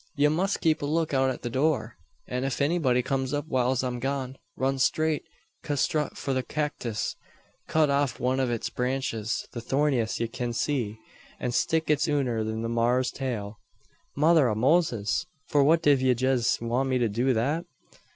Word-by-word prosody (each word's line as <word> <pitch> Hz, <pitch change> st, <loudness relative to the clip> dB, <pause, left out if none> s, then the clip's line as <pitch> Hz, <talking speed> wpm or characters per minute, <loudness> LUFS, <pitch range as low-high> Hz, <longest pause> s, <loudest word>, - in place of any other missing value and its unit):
Ye 145 Hz, 0 st, +4 dB
must 185 Hz, +6 st, 0 dB
keep 160 Hz, -2 st, +2 dB
a 145 Hz, -, -2 dB
look 160 Hz, 0 st, 0 dB
out 135 Hz, 0 st, +3 dB
at 130 Hz, -, -5 dB
the 120 Hz, -, -2 dB
door; 135 Hz, -3 st, 0 dB, 0.3 s
an 125 Hz, +1 st, -3 dB
ef 135 Hz, -1 st, -2 dB
anybody 140 Hz, -5 st, +2 dB
kums 135 Hz, +1 st, -1 dB
up 145 Hz, -, -2 dB
whiles 130 Hz, -3 st, +1 dB
I'm 125 Hz, -1 st, -2 dB
gone, 135 Hz, 0 st, -3 dB, 0.2 s
run 135 Hz, +1 st, 0 dB
straight 155 Hz, +3 st, +1 dB, 0.4 s
custrut 150 Hz, +1 st, -1 dB
for 135 Hz, -, -2 dB
the 130 Hz, -, +1 dB
cacktis, 130 Hz, -6 st, -3 dB, 0.5 s
cut 155 Hz, -2 st, +3 dB
off 140 Hz, -3 st, 0 dB
one 130 Hz, +1 st, +1 dB
o' 130 Hz, -2 st, +1 dB
its 120 Hz, -2 st, -2 dB
branches 125 Hz, -4 st, -2 dB
the 120 Hz, -, -6 dB
thorniest 135 Hz, -3 st, 0 dB
ye 115 Hz, -, 0 dB
kin 120 Hz, +1 st, -4 dB
see 120 Hz, -5 st, -1 dB, 0.4 s
an 125 Hz, -, -2 dB
stick 160 Hz, +6 st, +1 dB
it 150 Hz, -, +3 dB
unner 130 Hz, -7 st, 0 dB
the 110 Hz, +1 st, -3 dB
maar's 120 Hz, +2 st, +1 dB
tail." 110 Hz, -6 st, -4 dB, 0.6 s
"Mother 155 Hz, -2 st, +4 dB
av 105 Hz, -, -1 dB
Moses! 125 Hz, -, +2 dB, 0.2 s
For 145 Hz, -1 st, +4 dB
what 160 Hz, +3 st, +4 dB
div 140 Hz, -3 st, +4 dB
yez 130 Hz, -1 st, +2 dB
want 120 Hz, +3 st, -1 dB
me 130 Hz, -, +2 dB
to 120 Hz, -2 st, +2 dB
do 120 Hz, +5 st, +1 dB
that?" 145 Hz, +10 st, 0 dB
130 Hz, 175 wpm, -27 LUFS, 120-145 Hz, 0.6 s, Ye